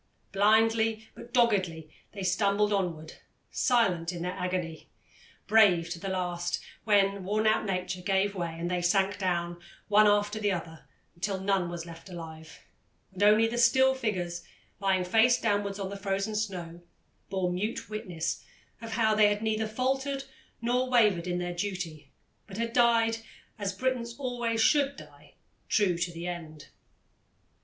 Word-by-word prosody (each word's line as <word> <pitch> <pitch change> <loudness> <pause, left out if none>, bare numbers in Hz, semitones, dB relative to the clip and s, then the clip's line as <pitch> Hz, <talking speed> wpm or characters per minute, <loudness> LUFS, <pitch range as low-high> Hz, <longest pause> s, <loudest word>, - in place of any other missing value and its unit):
Blindly, 220 +2 +3
but 240 - -12
doggedly, 190 -10 +1 0.2
they 200 -2 -6
stumbled 200 +2 +2
onward, 165 -5 -3 0.3
silent 185 -9 +2
in 170 -1 -5
their 180 - -2
agony, 180 -3 -4 0.6
brave 180 -7 +4
to 170 - -4
the 195 +2 -4
last 175 -2 -2 0.3
when 200 -2 +3
worn 210 +3 0
out 215 0 +3
nature 185 -1 -2
gave 195 +1 +1
way 170 -4 -4
and 175 +1 -2
they 180 -1 0
sank 195 +3 +1
down, 175 -2 -1 0.3
one 210 +1 +6
after 205 +1 +2
the 205 -1 +1
other, 160 -5 -6 0.3
till 195 +1 -2
none 190 -2 0
was 170 -1 -6
left 165 +2 -11
alive, 160 -2 -10 0.5
and 190 - -8
only 210 +2 +6
the 235 +1 -2
still 265 +3 +5
figures, 185 -9 -3 0.4
lying 190 -2 +1
face 225 +6 +4
downwards 205 -2 0
on 195 -1 -4
the - - -5
frozen 195 +2 -2
snow, 180 -5 -4 0.5
bore 185 -2 -1
mute 210 +5 -3
witness 200 -6 -4 0.4
of 225 -1 -6
how 220 -2 +2
they 215 -1 +5
had 205 +1 -1
neither 220 0 0
faltered 265 +4 -1 0.4
nor 250 +2 +1
wavered 210 -8 +3
in 175 0 -1
their 175 0 -3
duty, 175 -6 -5 0.4
but 195 -1 -9
had 230 0 -2
died, 230 -2 +3 0.4
as 200 -1 -1
Britons 235 +2 -2
always 240 -4 -2
should 280 +3 +3
die, - - -15 0.3
true 200 -5 +3
to 175 +1 -2
the 170 0 -7
end. 155 -5 -7
200 Hz, 155 wpm, -29 LUFS, 175-220 Hz, 0.6 s, one